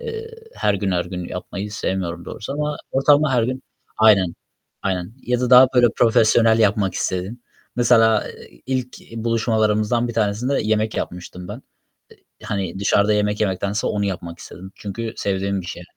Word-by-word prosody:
eee, 455 -1 -6 0.2
her 105 - +1
gün, 100 0 -1
her 90 -1 0
gün 90 0 -6
yapmayı 95 +3 -6
sevmiyorum 90 -4 -3
doğrusu. 105 - -6
Ama 150 +1 -2
ortalama 145 +2 +3
her 120 -3 +3
gün 130 +3 -3 0.3
Aynen, 100 -6 +4 0.5
aynen. 90 0 -2
Ya 125 0 -1
da 125 -1 -1
daha 130 +1 +9
böyle 125 -1 +6
profesyonel 115 0 +4
yapmak 105 -3 +2
istedin. 95 +7 -3 0.3
Mesela, 115 -3 +4
eee, - - -15
ilk 130 -1 -3 0.2
buluşmalarımızdan 115 0 +1
bir - - -4
tanesinde 115 +5 0
yemek 110 0 0
yapmıştım 90 0 -6
ben. 105 - -5
Eee, 125 - -17 0.6
hani, 95 -2 -3
dışarıda 100 +1 +2
yemek 105 0 0
yemektense 100 0 -1
onu 105 -1 -1
yapmak 85 -3 -5
istedim. 95 +2 -11
Çünkü 110 +3 -5
sevdiğim 100 0 -1
bir 85 - -10
şey. 90 -1 -7
105 Hz, 160 wpm, -21 LUFS, 95-120 Hz, 0.6 s, daha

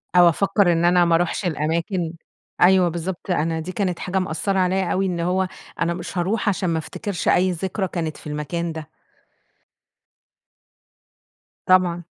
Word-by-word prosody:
أو 175 -1 +8
أفكّر 195 +1 +2
إن 170 +1 +2
أنا 175 0 +5
ما 170 -1 +3
أروحش 175 +3 0
الأماكن، 165 +2 -1 0.5
أيوه 180 -1 +5
بالضبط، 175 +2 -4
أنا 165 -1 0
دي 175 +3 -5
كانت 185 -2 -2
حاجة 190 +1 -1
مأثّرة 190 +2 -1
عليَّ 185 0 +1
أوي 195 +1 +1
إن 175 -2 -2
هو، 185 +2 0 0.3
أنا 170 +1 +1
مش 180 - -7
هاروح 205 +4 0
عشان 190 -2 -1
ما 165 - 0
أفتكرش 200 +3 -5
أي 185 +1 +4
ذكرى 190 +3 -2
كانت 160 -4 -4
في - - -11
المكان 155 +3 -3
ده. 160 -1 -7 2.8
طبعًا، 180 -2 +3
175 Hz, 155 wpm, -22 LUFS, 165-190 Hz, 2.8 s, أو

